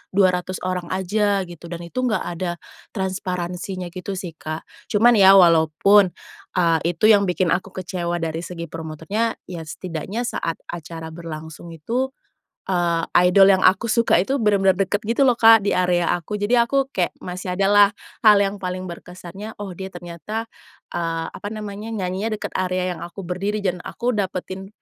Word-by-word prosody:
200 185 -1 +2
orang 185 -1 -2
aja 200 +1 +1
gitu 175 -1 -11
dan 170 0 -6
itu 170 +9 -5
enggak 215 - 0
ada 175 +1 -3 0.4
transparansinya 185 -1 -3
gitu 185 +2 -5
sih, 185 -2 -5
Kak. 155 +1 -5 0.2
Cuman, 225 +2 +4
ya 195 0 +8
walaupun, 175 +3 +5 0.5
eee, 165 -2 +3 0.2
itu 165 - -16
yang 200 -2 +4
bikin 180 -1 +1
aku 190 - 0
kecewa 175 -2 -3
dari 160 0 -2
segi 170 -1 -6
promotornya, 165 +8 -3
ya 175 -2 -7
setidaknya 185 +8 -5
saat 165 -8 -2 0.2
acara 165 -1 -7
berlangsung 160 0 -8
itu, 240 +12 -2 0.6
eee, 175 -3 +1 0.3
idol 195 +1 +7
yang 190 -1 +4
aku 195 +5 +4
suka 230 +1 +3
itu 265 +9 0
bener-bener 200 -4 +3
dekat 195 +2 0
gitu 235 +5 +2
loh 250 - +4
Kak, 225 -2 +7
di 200 - +1
area 180 -1 +2
aku. 175 +4 -5
Jadi, 205 +4 +2
aku 270 +3 +2
kayak 180 -7 -1
masih 180 0 -4
ada 195 +1 +2
lah, 205 -1 +7 0.4
hal 210 -1 +8
yang 200 0 0
paling 185 0 -4
berkesannya, 180 +4 -9
oh 205 -2 -5
dia 190 0 -5
ternyata, 175 +6 -6 0.5
eee, 165 -1 -2
apa 205 - -7
namanya 210 0 -6
nyanyinya 195 +3 -2
deket - - -5
area 185 0 -1
yang - - -11
aku 175 +3 -8
berdiri 195 +4 -2
dan 180 -2 -1
aku 245 +1 -2
dapetin 190 -1 -3
185 Hz, 165 wpm, -22 LUFS, 175-205 Hz, 0.6 s, ya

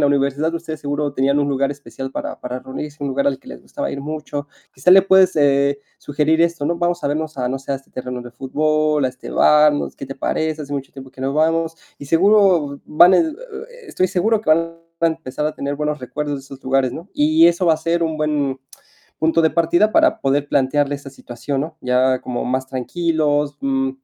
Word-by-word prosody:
la 145 - +4
universidad 140 +3 0
ustedes 165 -2 -5
seguro 145 0 -2
tenían 140 +1 +1
un 145 0 +1
lugar 140 0 0
especial 135 -2 -7
para - - -6
para 125 +1 -5
reunirse, 145 +3 -7
un - - -1
lugar 140 +1 +1
al 135 - -2
que - - -28
les - - -10
gustaba - - -5
ir 140 - -5
mucho. 145 -1 -5 0.3
Quizá 130 +7 +2
le 190 +1 +8
puedes, 190 -2 +4
eh, 140 -1 +3 0.2
sugerir 150 +3 0
esto, 170 -4 0
¿no? 170 - 0
Vamos 175 -1 -1
a - - +2
vernos 155 0 -3
a, 125 -1 -1
no 135 +1 -3
sé, 135 - -9
a 135 - +1
este 135 - -17
terreno 125 -1 -5
de 120 0 -10
fútbol, 155 +3 0
a - - +2
este 130 0 -10
bar, 150 0 +5
no 145 - -2
sé, - - -20
¿qué 135 - -7
te 135 - -8
parece? 155 +2 -2
Hace 145 0 -8
mucho 135 -1 -4
tiempo 135 -1 -12
que 130 - -13
no 135 +1 -1
vamos. 165 +2 +1 0.2
Y 145 - -9
seguro 175 -4 +3
van 175 +4 +6
a - - +5 0.6
estoy 185 - 0
seguro 205 +5 +1
que 215 - -1
van 155 - +6 0.4
a 170 - +4
empezar 150 -3 -4
a 155 - -3
tener 140 +1 -4
buenos 150 0 -2
recuerdos 145 +4 -4
de - - -7
esos 135 0 -12
lugares, 130 -1 +1
¿no? 170 +8 -9
Y 155 +3 +5
eso 175 +1 +2
va 165 - +5
a - - -4
ser 170 +1 -1
un 160 -1 -1
buen 145 -3 -1 0.6
punto 160 +1 +2
de 160 - +3
partida 170 +6 +2
para - - +3
poder 140 +1 0
plantearle 145 +1 +1
esta 140 -1 -11
situación, 135 +1 -5
¿no? 155 +2 -5
Ya 130 0 +2
como 125 - -3
más 130 +1 -1
tranquilos, 145 +1 -1
mm, 135 -1 0
145 Hz, 225 wpm, -20 LUFS, 135-160 Hz, 0.6 s, le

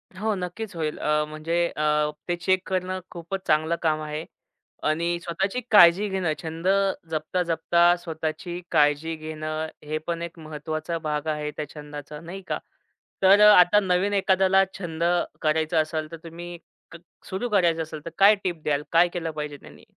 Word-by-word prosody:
हो, 215 +3 -1
नक्कीच 190 +3 -5
होईल. 155 -2 -2
अ, 150 0 +1
म्हणजे 165 +3 -1
अ, 150 0 +2 0.2
ते 175 - 0
चेक 185 +1 +2
करणं 185 0 -1
खूपच 170 +3 -5
चांगलं 155 +2 +2
काम 155 -2 +1
आहे 155 +1 -4 0.7
आणि 170 +2 0
स्वतःची 195 +8 -2
काळजी 190 +1 +7
घेणं, 185 -5 0
छंद 165 +2 -5 0.4
जपता-जपता 170 +2 +2
स्वतःची 170 +2 -4
काळजी 150 +2 +2
घेणं, 155 0 -4 0.2
हे 155 +1 -3
पण 170 -1 -2
एक 170 0 -7
महत्त्वाचा 155 +1 -4
भाग 150 -1 -3
आहे 150 -1 -2
त्या 150 - -2
छंदाचा, 150 0 -8
नाही 180 +4 -8
का? - - -2 0.6
तर 195 +2 +7
अ, 210 0 +9
आता 180 +4 +6
नवीन 190 +1 +1
एखाद्याला 190 -1 +4 0.2
छंद 165 -3 -4 0.4
करायचं 160 +1 +2
असेल, 155 0 -4
तर 165 - -7
तुम्ही 175 +1 -8 0.3
क 165 - -10 0.3
सुरू 215 +6 -3
करायचं 175 -5 +2
असेल, 155 -1 -9
तर 170 - -4
काय 205 +2 +7
टिप 175 -4 -3
द्याल? 145 -1 0
काय 170 +1 +5
केलं 165 -2 -3
पाहिजे 150 -1 -5
त्यांनी? - - -16
165 Hz, 160 wpm, -25 LUFS, 155-180 Hz, 0.7 s, अ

